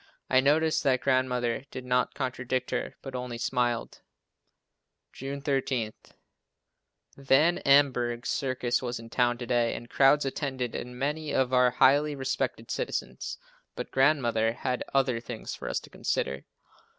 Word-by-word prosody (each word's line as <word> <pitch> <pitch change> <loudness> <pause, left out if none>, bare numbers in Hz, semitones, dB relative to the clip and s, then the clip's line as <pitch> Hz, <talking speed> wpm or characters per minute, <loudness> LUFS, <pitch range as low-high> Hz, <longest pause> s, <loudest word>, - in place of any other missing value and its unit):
I 130 - +6
noticed 155 +4 +3
that 130 -3 +2
Grandmother 130 -1 0
did 130 - -7
not 125 0 +1
contradict 130 -1 -2
her, - - -2
but 135 - -7
only 125 -2 -4
smiled. 120 0 -1 1.1
June 140 +1 -6
13. 135 -6 -1 1.2
Van 140 +5 +3
Amburgh's 125 -3 +3
circus 130 -3 0
was 120 -1 -3
in 115 0 -12
town 120 -1 +2
to 120 - -6
day 120 -1 +1
and 120 - -9
crowds 140 +1 +4
attended 130 -3 -3
and 125 0 -6
many 150 +3 -2
of 130 -1 +1
our 125 0 +5
most 125 - -12
highly 145 +2 +4
respected 135 -2 -2
citizens, - - -3 0.4
but - - -6
Grandmother 120 -5 +2
had 125 +1 -2
other 130 -3 +2
things 115 -1 -7
for - - -6
us - - -1
to - - -15
consider. 70 - -2
130 Hz, 145 wpm, -28 LUFS, 120-140 Hz, 1.2 s, I